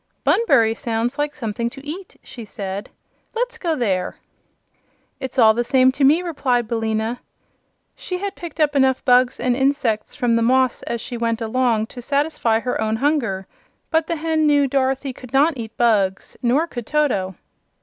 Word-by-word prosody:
"Bunbury 240 Hz, -, +3 dB
sounds 230 Hz, +3 st, -2 dB
like 295 Hz, 0 st, 0 dB
something 235 Hz, -4 st, -3 dB
to 275 Hz, +3 st, -12 dB
eat," 360 Hz, +5 st, -7 dB
she 235 Hz, -, -9 dB
said. 200 Hz, -2 st, -6 dB, 0.5 s
"Let's 480 Hz, 0 st, -2 dB
go 335 Hz, -6 st, 0 dB
there." 195 Hz, -9 st, -1 dB, 1.0 s
"It's 265 Hz, -1 st, -6 dB
all 220 Hz, -3 st, +7 dB
the 240 Hz, +2 st, 0 dB
same 260 Hz, +1 st, +4 dB
to 275 Hz, +2 st, -2 dB
me," 305 Hz, +6 st, +5 dB
replied 255 Hz, -8 st, 0 dB
Billina. 225 Hz, +1 st, -1 dB, 0.8 s
She 365 Hz, -, -4 dB
had 400 Hz, +1 st, -4 dB
picked 340 Hz, -2 st, -9 dB
up 295 Hz, -2 st, +2 dB
enough 265 Hz, -1 st, +2 dB
bugs 250 Hz, -1 st, +4 dB
and 245 Hz, 0 st, +1 dB
insects 265 Hz, -5 st, 0 dB
from 240 Hz, -2 st, +1 dB
the 230 Hz, -, +2 dB
moss 255 Hz, +1 st, +2 dB
as 235 Hz, -1 st, -4 dB
she 240 Hz, -, -5 dB
went 230 Hz, -1 st, -1 dB
along 230 Hz, -1 st, +1 dB
to 245 Hz, -, -8 dB
satisfy 280 Hz, -4 st, 0 dB
her 250 Hz, -2 st, -2 dB
own 220 Hz, 0 st, 0 dB
hunger, 235 Hz, -8 st, 0 dB, 0.5 s
but 320 Hz, -1 st, +2 dB
the 335 Hz, -, -1 dB
hen 315 Hz, -1 st, +1 dB
knew 290 Hz, -1 st, +4 dB
Dorothy 270 Hz, 0 st, 0 dB
could 255 Hz, 0 st, -13 dB
not 295 Hz, +5 st, +4 dB
eat 225 Hz, -3 st, -8 dB
bugs; 205 Hz, -5 st, +1 dB
nor 265 Hz, +6 st, +2 dB
could 240 Hz, -9 st, -7 dB
Toto. 225 Hz, -12 st, 0 dB
255 Hz, 170 wpm, -21 LUFS, 225-290 Hz, 1.0 s, all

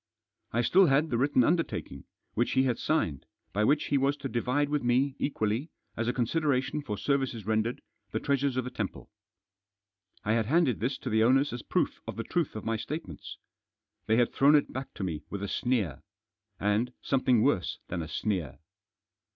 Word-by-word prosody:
I 120 Hz, -, +1 dB
still 185 Hz, +9 st, +5 dB
had 145 Hz, +3 st, +2 dB
the 120 Hz, -, +1 dB
written 135 Hz, -1 st, +3 dB
undertaking, 155 Hz, -, -1 dB, 0.3 s
which 120 Hz, -, 0 dB
he 130 Hz, -, +4 dB
had 125 Hz, -3 st, 0 dB
signed, 85 Hz, -, 0 dB, 0.3 s
by 105 Hz, +3 st, +1 dB
which 145 Hz, +6 st, +2 dB
he 140 Hz, -, +3 dB
was 140 Hz, +2 st, +1 dB
to 135 Hz, -, -4 dB
divide 125 Hz, +5 st, 0 dB
with 150 Hz, -1 st, 0 dB
me 130 Hz, +3 st, +2 dB
equally, 115 Hz, +2 st, -1 dB, 0.3 s
as 115 Hz, +1 st, -2 dB
a -, -, +3 dB
con 125 Hz, -1 st, +1 dB
sideration 145 Hz, 0 st, 0 dB
for 105 Hz, -7 st, -4 dB
services 125 Hz, -1 st, -1 dB
rendered, 110 Hz, +4 st, 0 dB, 0.3 s
the -, -, -2 dB
treasures 140 Hz, -2 st, 0 dB
of 130 Hz, -, +1 dB
the 125 Hz, -, -6 dB
temple. -, -, -5 dB, 1.1 s
I 105 Hz, -, +1 dB
had 110 Hz, -2 st, +1 dB
handed 150 Hz, -4 st, +3 dB
this 130 Hz, +4 st, -1 dB
to -, -, -5 dB
the 110 Hz, 0 st, +4 dB
owners 135 Hz, +4 st, +3 dB
as 120 Hz, -, -4 dB
proof -, -, -1 dB
of -, -, -4 dB
the 115 Hz, -, -3 dB
truth 170 Hz, +1 st, -1 dB
of 110 Hz, -, -6 dB
my 115 Hz, 0 st, 0 dB
statements. 110 Hz, -, -6 dB, 0.7 s
They 110 Hz, -, +4 dB
had 120 Hz, -1 st, +2 dB
thrown 145 Hz, +2 st, +5 dB
it 145 Hz, -, +2 dB
back 130 Hz, +1 st, -5 dB
to -, -, -4 dB
me 80 Hz, -5 st, -3 dB
with 100 Hz, -1 st, -5 dB
a -, -, -2 dB
sneer. 105 Hz, -, -1 dB, 0.6 s
And 105 Hz, +5 st, +1 dB
something 130 Hz, -4 st, +3 dB
worse 115 Hz, -11 st, +1 dB
than 85 Hz, -1 st, -2 dB
a 80 Hz, -, -5 dB
sneer. 85 Hz, -, -2 dB
125 Hz, 190 wpm, -29 LUFS, 110-140 Hz, 1.1 s, still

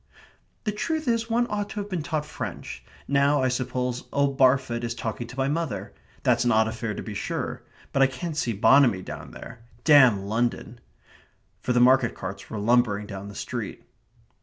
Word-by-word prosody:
("The 215 Hz, -, 0 dB
truth 310 Hz, +8 st, -2 dB
is 230 Hz, -1 st, +1 dB
one 235 Hz, +1 st, +2 dB
ought 205 Hz, 0 st, -2 dB
to 210 Hz, -, -5 dB
have 200 Hz, -, -4 dB
been 180 Hz, -3 st, -1 dB
taught 150 Hz, 0 st, -2 dB
French. -, -, -7 dB, 0.2 s
Now, 140 Hz, 0 st, +3 dB
I 130 Hz, -, +3 dB
suppose, 125 Hz, 0 st, -2 dB
old 140 Hz, -1 st, +1 dB
Barfoot 130 Hz, -3 st, +3 dB
is 120 Hz, 0 st, -3 dB
talking 120 Hz, 0 st, -4 dB
to 125 Hz, +2 st, -11 dB
my 135 Hz, 0 st, +1 dB
mother. 140 Hz, -, -3 dB, 0.3 s
That's -, -, +3 dB
an 120 Hz, -, +2 dB
odd 110 Hz, 0 st, +4 dB
affair 110 Hz, -1 st, -4 dB
to -, -, -5 dB
be 110 Hz, -, -6 dB
sure. 100 Hz, -, -3 dB, 0.3 s
But 135 Hz, -, +2 dB
I 135 Hz, -, +7 dB
can't 150 Hz, +5 st, -5 dB
see 120 Hz, -6 st, 0 dB
Bonamy 115 Hz, -2 st, +4 dB
down -, -, -8 dB
there. -, -, -10 dB, 0.2 s
Damn 130 Hz, -10 st, +6 dB
London!") 120 Hz, +2 st, -2 dB, 0.8 s
for -, -, -1 dB
the 125 Hz, -, +3 dB
market 125 Hz, -1 st, +4 dB
carts 95 Hz, +1 st, -7 dB
were 110 Hz, -, -5 dB
lumbering 105 Hz, -1 st, +2 dB
down 100 Hz, -1 st, -7 dB
the 100 Hz, -, -10 dB
street. -, -, -5 dB
125 Hz, 185 wpm, -25 LUFS, 110-145 Hz, 0.8 s, I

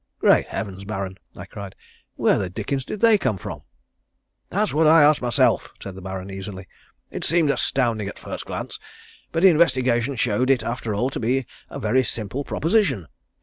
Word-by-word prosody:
"Great -, -, +4 dB
Heavens, 95 Hz, -1 st, -5 dB
Baron," 95 Hz, -2 st, -5 dB, 0.2 s
I 90 Hz, -, -8 dB
cried. 100 Hz, -1 st, -9 dB, 0.4 s
"Where -, -, +2 dB
the 95 Hz, -3 st, -2 dB
dickens 135 Hz, +8 st, -3 dB
did 210 Hz, -, -6 dB
they 225 Hz, -3 st, +6 dB
come 105 Hz, -, 0 dB
from?" -, -, -7 dB, 0.9 s
"That's 210 Hz, +3 st, 0 dB
what 155 Hz, +1 st, +4 dB
I 160 Hz, 0 st, +7 dB
asked 150 Hz, 0 st, +5 dB
myself," 120 Hz, -1 st, +2 dB
said 100 Hz, -, -7 dB
the 95 Hz, -, -10 dB
Baron 95 Hz, +1 st, -6 dB
easily. 95 Hz, -1 st, -7 dB, 0.4 s
"It -, -, -5 dB
seemed 165 Hz, -3 st, +3 dB
astounding 115 Hz, -7 st, 0 dB
at -, -, -7 dB
first -, -, -7 dB
glance, -, -, -5 dB, 0.5 s
but 165 Hz, +2 st, -1 dB
investigation 135 Hz, -8 st, +3 dB
showed 125 Hz, +1 st, +1 dB
it 135 Hz, -3 st, +3 dB
after 115 Hz, -3 st, -3 dB
all 125 Hz, +6 st, 0 dB
to -, -, -4 dB
be 125 Hz, +3 st, 0 dB, 0.2 s
a -, -, -7 dB
very 130 Hz, +1 st, +2 dB
simple 120 Hz, +3 st, -4 dB
proposition. 150 Hz, -, 0 dB
120 Hz, 175 wpm, -23 LUFS, 100-145 Hz, 0.9 s, I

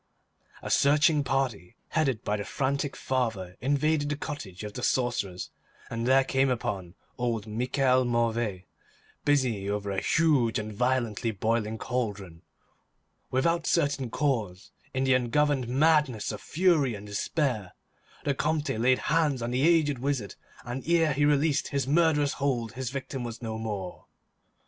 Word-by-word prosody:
A -, -, -4 dB
searching 150 Hz, +1 st, +4 dB
party, 125 Hz, -9 st, -2 dB
headed 135 Hz, -8 st, 0 dB
by 105 Hz, -, 0 dB
the 105 Hz, -, -3 dB
frantic 140 Hz, +4 st, -2 dB
father, 110 Hz, -9 st, -2 dB
invaded 145 Hz, +3 st, +1 dB
the 145 Hz, -, 0 dB
cottage 110 Hz, -, -7 dB
of 105 Hz, -1 st, -6 dB
the 125 Hz, -, -6 dB
sorcerers 120 Hz, -8 st, -1 dB, 0.4 s
and 115 Hz, +1 st, -2 dB
there 135 Hz, +1 st, +5 dB
came 135 Hz, 0 st, +1 dB
upon 100 Hz, -7 st, -3 dB, 0.2 s
old 115 Hz, -4 st, -1 dB
Michel 125 Hz, +4 st, +1 dB
Mauvais, 115 Hz, -5 st, 0 dB, 0.6 s
busy 125 Hz, -9 st, +1 dB
over 100 Hz, -1 st, -2 dB
a 95 Hz, -, -1 dB
huge 145 Hz, -9 st, +2 dB
and 110 Hz, -1 st, -4 dB
violently 120 Hz, -1 st, 0 dB
boiling 110 Hz, +1 st, -1 dB
cauldron. 105 Hz, -10 st, -4 dB, 0.9 s
Without 165 Hz, +6 st, +1 dB
certain 145 Hz, -6 st, +1 dB
cause, 115 Hz, -8 st, -2 dB, 0.2 s
in 130 Hz, 0 st, -1 dB
the 130 Hz, 0 st, +3 dB
ungoverned 130 Hz, +1 st, +1 dB
madness 140 Hz, -4 st, +2 dB
of 105 Hz, -, -7 dB
fury 155 Hz, -, +2 dB
and 100 Hz, 0 st, -9 dB
despair, 105 Hz, -, -2 dB, 0.5 s
the 145 Hz, -, +1 dB
Comte 150 Hz, +1 st, -1 dB
laid 125 Hz, +3 st, +3 dB
hands 150 Hz, -4 st, +1 dB
on 120 Hz, -, -2 dB
the 125 Hz, +1 st, 0 dB
aged 155 Hz, -4 st, +3 dB
wizard, 130 Hz, -7 st, -2 dB, 0.3 s
and 125 Hz, +2 st, -5 dB
ere 165 Hz, -3 st, +3 dB
he 145 Hz, +2 st, +2 dB
released 145 Hz, 0 st, +2 dB
his 140 Hz, -1 st, -1 dB
murderous 150 Hz, -1 st, +3 dB
hold 120 Hz, -5 st, -1 dB
his 130 Hz, 0 st, -4 dB
victim 135 Hz, -1 st, -5 dB
was 120 Hz, 0 st, -7 dB
no 110 Hz, -1 st, -4 dB
more. 100 Hz, -5 st, -5 dB
130 Hz, 145 wpm, -28 LUFS, 110-145 Hz, 0.9 s, there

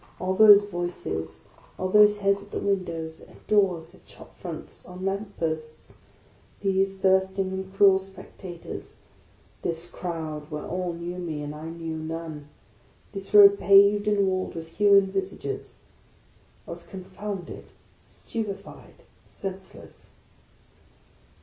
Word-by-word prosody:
All 185 Hz, +1 st, -1 dB
those 205 Hz, 0 st, +8 dB
voices, 175 Hz, -, -4 dB, 0.4 s
all 185 Hz, -, -1 dB
those 210 Hz, +1 st, +6 dB
heads 200 Hz, 0 st, +2 dB
at 205 Hz, -, -14 dB
the -, -, -4 dB
windows, 170 Hz, -5 st, -2 dB
at -, -, -17 dB
doors, 180 Hz, -5 st, +1 dB
at 185 Hz, -, -21 dB
shop -, -, -15 dB
fronts, 170 Hz, -4 st, -8 dB
on 180 Hz, +1 st, -8 dB
lamp 200 Hz, +1 st, -3 dB
posts; 155 Hz, -1 st, -5 dB, 0.6 s
these 195 Hz, 0 st, +1 dB
thirsting 190 Hz, 0 st, +2 dB
and 190 Hz, 0 st, -5 dB
cruel 195 Hz, -1 st, +5 dB
spectators; 190 Hz, -2 st, -10 dB, 0.7 s
this 170 Hz, 0 st, -3 dB
crowd 160 Hz, -4 st, -5 dB
where 150 Hz, -2 st, -5 dB
all 180 Hz, -1 st, -3 dB
knew 170 Hz, +2 st, -6 dB
me, 160 Hz, -4 st, -4 dB
and 145 Hz, 0 st, -5 dB
I 155 Hz, +2 st, -7 dB
knew 165 Hz, -1 st, -5 dB
none; 155 Hz, -2 st, -6 dB, 0.6 s
this 195 Hz, -1 st, -8 dB
road 200 Hz, -1 st, +8 dB
paved 200 Hz, +1 st, +6 dB
and 205 Hz, -1 st, +3 dB
walled 185 Hz, -1 st, -1 dB
with 165 Hz, -1 st, -7 dB
human 200 Hz, +2 st, +5 dB
visages, 385 Hz, 0 st, -4 dB, 0.5 s
— -, -, -33 dB
I -, -, -7 dB
was -, -, -9 dB
confounded, 190 Hz, 0 st, -7 dB, 0.4 s
stupefied, 200 Hz, -4 st, -7 dB, 0.2 s
senseless. 190 Hz, -1 st, -9 dB
185 Hz, 130 wpm, -26 LUFS, 165-200 Hz, 0.7 s, those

